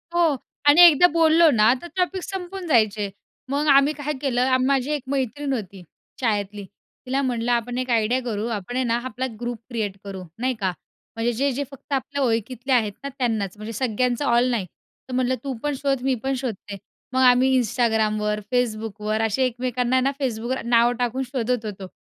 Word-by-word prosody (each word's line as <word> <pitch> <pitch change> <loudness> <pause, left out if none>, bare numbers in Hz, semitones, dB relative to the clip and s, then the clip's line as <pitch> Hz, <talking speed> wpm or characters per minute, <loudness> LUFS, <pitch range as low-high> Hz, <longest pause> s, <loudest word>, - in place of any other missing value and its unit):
हो 330 -4 +3 0.3
आणि 295 +4 +8
एकदा 345 +2 +7
बोललो 330 0 +5
ना 220 -1 +5
तर 345 - -8
टॉपिक 370 0 -1
संपून 380 -1 -6
जायचे. 215 -6 +2 0.4
मग 290 +2 0
आम्ही 280 +1 +5
काय 295 0 -4
केलं, 255 -1 +2
माझी 270 +1 +1
एक 295 -3 -2
मैत्रीण 275 +1 -2
होती 195 -5 -6 0.4
शाळेतली, 205 -3 -1 0.4
तिला 265 +2 0
म्हटलं, 245 -2 -1
"आपण 240 +1 -1
एक 255 0 -3
आयडिया 235 +1 +2
करू 220 -2 -3
आपण 210 +4 -6
आहे 260 - +1
ना, 230 0 +1
आपला 255 +1 -3
ग्रुप 240 0 -3
क्रिएट 215 -5 -3
करू, 195 -2 -7 0.2
नाही 255 +1 0
का. 190 -3 0 0.4
म्हणजे 225 +1 0
जे-जे 275 +3 0
फक्त 275 +1 -9
आपल्या 280 +1 -1
ओळखतले 245 +2 -1
आहेत 220 -4 +2
ना 280 - -3
त्यांनाच. 220 -7 -1
म्हणजे 215 +2 -7
सगळ्यांचं 250 +3 0
ऑल 240 0 +3
नाही 220 -6 -1 0.4
तर - - -6
म्हटलं 255 0 +1
तू 275 -1 -3
पण 295 -1 0
शोध, 275 -2 0
मी 265 -1 +1
पण 270 - 0
शोधते." 210 -5 -5 0.4
मग 260 - +2
आम्ही 250 +1 +5
Instagramवर, 215 -2 0
Facebookवर 215 -3 -1
असे 225 +4 0
एकमेकांना 250 0 -1
आहे 255 - +3
ना, 275 - +2
Facebookवर 245 0 -2
नाव 235 0 +4
टाकून 245 +2 -1
शोधत 245 -3 -2
होतो 195 -3 -6
245 Hz, 180 wpm, -23 LUFS, 220-270 Hz, 0.4 s, आणि